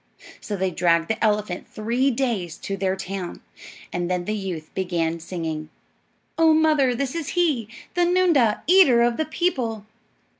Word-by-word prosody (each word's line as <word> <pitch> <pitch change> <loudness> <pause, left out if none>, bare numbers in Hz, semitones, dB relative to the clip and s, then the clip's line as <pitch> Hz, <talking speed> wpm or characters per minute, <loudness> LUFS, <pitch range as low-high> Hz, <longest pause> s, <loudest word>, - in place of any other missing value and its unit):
So 210 - -5
they 190 -1 -1
dragged 170 -1 +2
the 225 - -1
elephant 210 -4 0
three 235 +5 0
days 230 -10 -2
to 195 - -4
their 190 -1 -1
town, 190 -1 -6 0.5
and 175 0 -2
then 180 -1 -1
the 215 - -2
youth 185 -7 -5
began 170 -3 -1
singing, 160 -2 -5 0.7
"Oh, 320 -1 +6
mother, 305 -5 +3
this 260 +1 -2
is 330 -4 -4
he, 295 -11 +2 0.3
The 355 - 0
noondah, 345 -11 +3
eater 330 -10 +6
of 235 0 +1
the 315 - 0
people." 250 - -2
215 Hz, 155 wpm, -23 LUFS, 180-275 Hz, 0.7 s, Oh